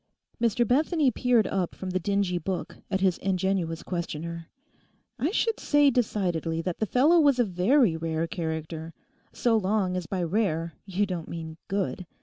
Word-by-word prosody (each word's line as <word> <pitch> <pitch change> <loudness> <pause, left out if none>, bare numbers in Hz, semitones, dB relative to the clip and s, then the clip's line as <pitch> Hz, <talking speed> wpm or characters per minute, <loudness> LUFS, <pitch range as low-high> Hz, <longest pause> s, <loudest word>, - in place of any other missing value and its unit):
Mr 235 0 +2
Bethany 295 - +3
peered 245 -2 +2
up 185 -3 -2
from 185 -1 -5
the 185 - 0
dingy 195 -1 0
book 185 +2 -4
at 190 -1 -1
his 185 -2 +2
ingenuous 185 -3 -1
questioner. 170 -1 -4 0.7
'I 280 +7 +1
should 450 +2 0
say 290 -1 +4
decidedly 180 - 0
that 170 +1 -3
the 220 - 0
fellow 295 - +4
was 285 -4 +4
a 245 - +4
very 200 - +3
rare 160 0 -1
character, 160 -2 -5 0.4
so 235 -2 +1
long 195 -3 +1
as 180 -3 -3
by 185 -2 -2
rare 165 -3 0
you 195 +2 +1
don't 180 -4 -5
mean 160 -1 -6
good. 195 -2 -2
190 Hz, 160 wpm, -27 LUFS, 170-225 Hz, 0.7 s, say